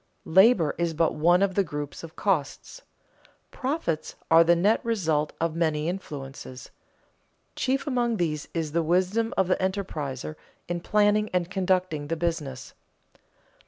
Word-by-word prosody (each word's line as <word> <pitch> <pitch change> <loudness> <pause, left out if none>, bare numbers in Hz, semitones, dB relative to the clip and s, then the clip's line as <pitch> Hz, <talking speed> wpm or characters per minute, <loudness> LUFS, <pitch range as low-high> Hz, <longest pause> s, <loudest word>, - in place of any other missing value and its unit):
Labor 190 -2 +5
is 170 -1 0
but 165 0 +2
one 175 +5 +3
of 195 -1 +1
the 200 - +2
groups 145 -3 -6
of 165 -1 -10
costs. 180 - -2 0.7
Profits 255 - -3 0.2
are 165 +1 +8
the 170 +1 +4
net 200 +6 +2
result 160 -10 0
of 165 -1 -1
many 160 -2 0
influences. 135 -7 -7 0.8
Chief 265 +1 0
among 240 -5 0
these 150 -4 -2
is 160 -3 -3
the 170 +2 +1
wisdom 185 +7 +1
of 190 - +3
the 185 - +2
enterpriser 155 -7 -3 0.3
in 175 0 -2
planning 210 +2 +2
and 180 0 0
conducting 185 -5 0
the 165 +2 -2
business. 155 -6 -3
170 Hz, 140 wpm, -26 LUFS, 155-195 Hz, 0.8 s, are